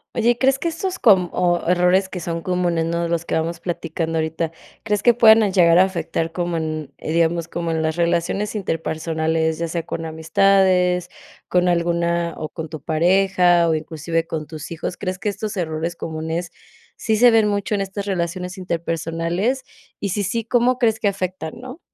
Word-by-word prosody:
Oye, 235 +1 +2
¿crees 270 +1 +2
que 340 - -2
estos 365 +3 -3
com 185 -6 +4
o 175 -1 +2
errores 180 +2 +3
que 185 - -6
son 165 0 -4
comunes, 175 -3 0
¿no?, 170 +1 -1
de 170 - -2
los 170 0 -1
que - - -4
vamos 165 +1 -1
platicando 165 -2 -3
ahorita, 160 +1 -2 0.3
crees 210 -2 0
que 240 -2 +5
puedan 225 -2 +7
a 210 - +2
llegar 175 -2 +5
a 190 - +7
afectar 165 -3 -3
como 175 0 -2
en, 155 -3 -4
eh, - - -5
digamos, 170 0 +1
como 170 -1 -3
en 160 0 0
las 160 0 -1
relaciones 170 +5 0
interpersonales, 160 -3 -1
ya 170 0 -2
sea 170 +1 -2
con 165 - -4
amistades, 180 +2 +2 0.4
con 180 0 +2
alguna, 170 -1 0
o 155 - -5
con 160 -1 -7
tu 155 -1 -7
pareja, 175 +2 +3
o 160 - +2
inclusive 160 +1 -2
con 155 -2 -4
tus 155 -1 -8
hijos? 170 +2 -5
¿Crees 185 -1 -3
que 210 +1 -2
estos 210 0 -5
errores 165 0 -2
comunes 160 +2 -4 0.4
sí 220 -1 0
se 240 +2 +7
ven 220 -2 +4
mucho 205 0 -1
en 200 - +1
estas 195 +1 -4
relaciones 180 -1 -3
interpersonales? 170 - -2 0.4
Y 200 - -2
si, 205 +3 -1
sí, 215 +4 -1
¿cómo 245 +1 +2
crees 225 -3 +1
que 205 - +1
afectan, 185 -4 -3
no? 255 +5 -9
175 Hz, 190 wpm, -21 LUFS, 165-195 Hz, 0.4 s, puedan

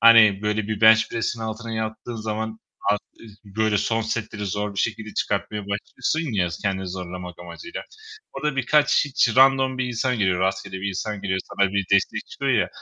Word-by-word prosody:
hani, 110 -3 +7
böyle, 105 0 0
bir 110 -2 -2
bench 110 0 +7
press'in 115 0 -2
altına 110 +1 -5
yattığın 110 +1 -4
zaman 110 0 -3 0.3
ar 105 - +3 0.2
iz 110 -3 -13
böyle, 105 +1 +1
son 115 +3 0
setleri 110 -2 -3
zor 105 +1 -2
bir 100 - -5
şekilde 110 -1 -2
çıkartmaya 105 -1 -1
başlıyorsun 115 +9 -2
ya, 90 -3 +1
s 85 - -6
kendini 95 -2 -1
zorlamak 90 -1 -6
amacıyla. 215 - -8 0.5
Orada 150 -2 -2
birkaç 145 +5 +3
hiç 130 -5 +1
random 130 0 +5
bir 130 - +1
insan 125 0 -1
geliyor, 95 -3 +2
rastgele 95 0 -1
bir 100 - -1
insan 100 +2 -3
geliyor, 95 -1 0
sana 100 -1 0
bir 100 -1 +1
destek 100 - +2
çıkıyor - - -1
ya! - - +2
110 Hz, 185 wpm, -24 LUFS, 100-115 Hz, 0.5 s, hani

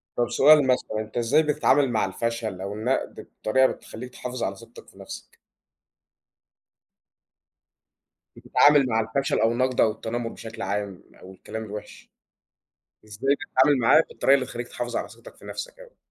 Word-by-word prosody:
طب 120 0 0
سؤال 145 -1 +6
مثلًا، 125 -4 0
أنت 110 +1 -6
إزاي 135 +7 +3
بتتعامل 145 -3 +2
مع 110 -4 +1
الفشل 110 -1 -3
أو 100 +1 -4
النقد 115 +5 -3 0.2
بطريقة 130 +4 +4
بتخلّيك 125 +3 -8
تحافظ 125 -1 -5
على 100 - -2
ثقتك - - -15
في - - -20
نفسك؟ - - -10 3.0
بتتعامل 145 -1 +4
مع 115 -1 +1
الفشل 115 +5 -1
أو 115 - +3
النقد 130 +1 +1
أو 110 - +4
التنمر 115 +2 -4
بشكل 115 0 -10
عام، 100 -1 -4 0.2
أو 95 - -12
الكلام 110 +4 -7
الوحِش، 105 -1 -9 1.0
إزاي 125 +7 0
بتتعامل 140 -3 +2
معاه 120 +7 +5
بالطريقة 135 - +3
اللي 135 -2 -1
تخلّيك 120 -1 -6
تحافظ 120 -1 -5
على - - -3
ثقتك - - -15
في - - -17
نفْسك - - -7
يعني؟ - - -16
120 Hz, 155 wpm, -25 LUFS, 110-135 Hz, 3.0 s, سؤال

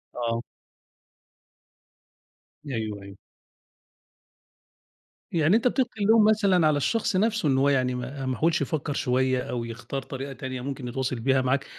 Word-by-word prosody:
آه. 115 -1 -1 2.2
أيوه 110 -6 -4
أيوه. 100 0 -11 2.1
يعني 165 +4 +3
أنت 235 +2 +3
بتلقي 245 -5 -1
اللوم 220 +1 +5
مثلًا 200 -6 +4
على 150 - +2
الشخص 225 - 0
نفسه 215 -5 +1
إن 130 - +2
هو 140 +1 +3
يعني 130 -2 +1
ما 130 +2 -5
ما 130 -2 -2
حاولش 165 +1 +2
يفكر 150 -2 -2
شوية 130 -1 +1
أو 120 -1 -2
يختار 120 +4 -5
طريقة 135 +1 -6
تانية 130 -1 -6
ممكن 135 -1 -5
يتواصل 130 0 -2
بيها 130 +2 +2
معاك 130 +1 0
135 Hz, 135 wpm, -26 LUFS, 125-170 Hz, 2.2 s, اللوم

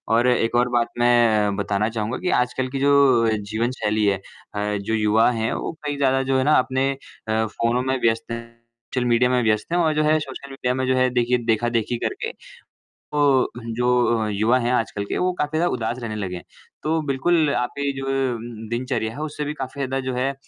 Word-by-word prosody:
और 120 +2 +3
एक 120 -2 +2
और 120 +1 +3
बात 120 -1 +1
मैं 115 -4 +3
बताना 100 +1 0
चाहूँगा 110 +2 -3
कि 180 - -2
आजकल 125 +1 -2
की 135 +1 -4
जो 140 -4 +4
जीवन 110 +4 -2
शैली 105 0 +1
है 100 -1 +2 0.4
अ 105 0 -1
जो 100 +3 -3
युवा 110 +1 +3
हैं 115 -1 -1
वो - - -3
कहीं 145 -1 -2
ज़्यादा 135 -1 +2
जो 135 0 +1
है 130 - +2
ना 150 +3 +4
अपने 130 +1 0 0.4
अ 110 0 +1
फ़ोनों 115 +3 0
में 130 +1 0
व्यस्त 115 0 0
हैं, 115 0 -7 0.4
सोशल 125 -1 +1
मीडिया 120 +1 +3
में 125 -1 +2
व्यस्त 110 +4 0
हैं 175 - +2
और 160 -2 +2
जो 155 - +2
है 155 +1 +4
सोशल 140 -1 -8
मीडिया 130 -2 -1
में 130 0 -1
जो 130 - +2
है 130 0 +3
देखिए 120 0 +2
देखा-देखी 115 +1 0
करके, - - -3 0.6
तो 145 -3 +1 0.3
जो 120 -2 +2
युवा 110 +5 +2
हैं 120 0 0
आजकल 105 -4 -1
के - - -3
वो 185 0 +1
काफ़ी 150 +1 -1
ज़्यादा 175 +2 +2
उदास 120 0 -3
रहने 115 -3 -5
लगे 95 -3 -4
हैं। 85 - -9 0.4
तो 160 +1 +1
बिल्कुल 150 +3 +2
आप 125 0 0 0.3
जो 135 0 -4
उम, 135 -2 0
उम, 115 -1 -8
दिनचर्या 120 -2 -2
है 140 - -9
उससे 150 -1 -4
भी 150 +1 -3
काफ़ी 135 0 -6
ज़्यादा 135 0 -1
जो 130 - -1
है 130 +2 -1
125 Hz, 215 wpm, -22 LUFS, 110-135 Hz, 0.6 s, जो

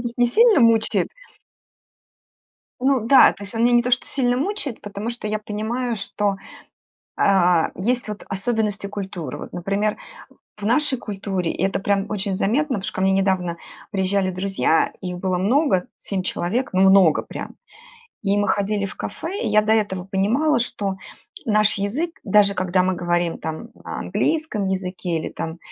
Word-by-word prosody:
есть 240 0 -5
не 245 - +5
сильно 440 - +5
мучает. 230 -2 +3 1.7
Ну 260 -3 +2
да, 270 - +7
то - - -13
есть 200 - -7
он 225 - 0
меня 245 - +4
не 240 - +5
то 250 - -2
что 255 - +2
сильно 245 -3 +1
мучает, 295 - -2
потому 205 +2 -5
что 235 -3 -4
я 215 0 -1
понимаю, 225 +3 -3
что, 200 0 -2 0.8
а, 180 -4 +3
есть 240 +6 -1
вот 210 0 -6
особенности 205 -1 -1
культуры. 190 -8 -6
Вот, - - -9
например, 200 +4 -1 0.6
в 210 - -9
нашей 265 +3 +2
культуре 195 -5 -3
это 195 +3 0
прям 195 0 0
очень 200 -2 -2
заметно, 255 +8 +1
потому 190 - -8
что - - -5
ко - - -3
мне 190 0 +3
недавно 190 -3 +1 0.4
приезжали 190 -1 +1
друзья, 185 -3 +1
и 185 - -4
их 180 - -5
было 185 -1 -1
много, 210 - +2
7 195 -2 -3
человек, 200 +8 -2
ну, 185 0 +3
много 190 -4 +5
прям, - - -8 0.7
и 200 0 +1
мы 205 - +1
ходили 200 +1 0
в 200 - -8
кафе. 395 +7 -5
И - - 0
я 215 - +5
до 215 +1 0
этого 205 -4 0
понимала, 225 +10 +1
что 200 -5 -2 0.5
наш 215 -1 +3
язык, 245 +13 -2
даже 200 0 +4
когда 185 -1 +1
мы 185 0 +1
говорим 175 -1 -1
там 160 +9 -6
на - - -5
английском 310 -11 -1
языке 185 -2 -2
или, - - -4
там, 160 +1 -6
205 Hz, 170 wpm, -22 LUFS, 190-235 Hz, 1.7 s, да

